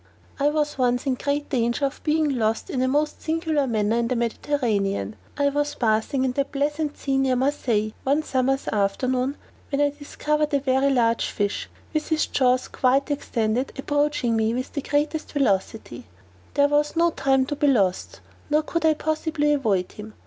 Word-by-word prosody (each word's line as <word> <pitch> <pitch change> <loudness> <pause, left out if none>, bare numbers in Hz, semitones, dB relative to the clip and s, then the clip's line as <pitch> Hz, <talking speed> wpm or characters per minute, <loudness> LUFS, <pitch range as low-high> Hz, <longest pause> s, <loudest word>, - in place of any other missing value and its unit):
_ - - -1
I 290 - +5
was 295 -2 -1
once 245 -1 +1
in 270 - +1
great 285 +3 -2
danger 240 0 +1
of 275 - -4
being 300 -4 +1
lost 220 0 -1
in 255 - -1
a 260 - +2
most 295 +3 0
singular 315 -3 0
manner 220 -1 +1
in 235 0 +1
the 250 - -1
Mediterranean: 220 - -1 0.2
I 285 -1 +3
was 290 +1 -1
bathing 225 +4 +1
in 260 - +1
that 275 +2 -2
pleasant 295 +1 -1
sea 270 -1 0
near 265 -1 +2
Marseilles 245 -5 0
one 285 +3 +1
summer's 270 -1 0
afternoon, 250 +7 0 0.3
when 280 - -1
I 290 0 +3
discovered 300 +1 -2
a - - +3
very 265 0 +2
large 230 -4 +2
fish, 205 -1 -2 0.2
with 310 -1 -1
his 315 -1 +2
jaws 255 -1 +1
quite 270 +3 +1
extended, 245 -3 -1
approaching 290 -3 0
me 220 +1 +1
with 255 +1 -4
the 285 - -2
greatest 295 +3 -1
velocity; 205 - -1 0.5
there 285 0 +5
was 295 +1 +1
no 340 +1 +3
time 270 -3 +2
to 290 - -3
be 290 0 +1
lost, 195 -9 +1 0.3
nor 305 +1 +2
could 335 +1 -2
I 315 -1 +4
possibly 310 -1 0
avoid 205 -10 0
him. 215 0 -10
270 Hz, 180 wpm, -24 LUFS, 235-295 Hz, 0.5 s, I